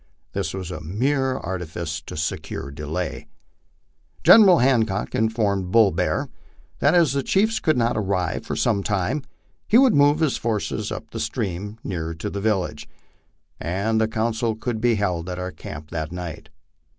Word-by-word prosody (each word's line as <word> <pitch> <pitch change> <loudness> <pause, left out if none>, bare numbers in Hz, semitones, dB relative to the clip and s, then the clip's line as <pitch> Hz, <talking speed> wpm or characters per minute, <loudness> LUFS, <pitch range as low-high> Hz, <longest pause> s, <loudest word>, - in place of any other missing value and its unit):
This 95 -5 -2
was 95 -2 -5
a - - -6
mere 130 - 0
artifice 85 -3 -4
to - - -7
secure 80 -2 -4
delay. 75 +3 -4 1.0
General 200 -6 +8
Hancock 115 -6 +1
informed 105 -4 0
Bull 110 -1 +5
Bear - - 0 0.5
that - - +4
as 165 -6 +4
the 140 - +1
chiefs 215 +9 +2
oould 155 - +2
not 120 -1 +1
arrive 95 -4 -1
for - - -4
some 110 -4 +1
time, 105 +9 -1 0.5
he 220 - +5
would 260 -2 +6
move 145 +1 +5
his 155 -5 +1
forces 110 -3 -2
up - - -6
the - - -5
stream 100 +3 -3
nearer 85 -3 -4
to 80 - -5
the 100 - -4
village, 95 -8 -1 0.7
and 100 +6 0
the 110 - +3
council 110 +1 -1
could 110 0 -3
be 120 -1 +3
held 90 -4 -1
at 90 - -4
our 90 0 -4
camp 75 -1 -9
that 80 -1 -3
night. 85 -4 -7
100 Hz, 160 wpm, -23 LUFS, 85-120 Hz, 1.0 s, General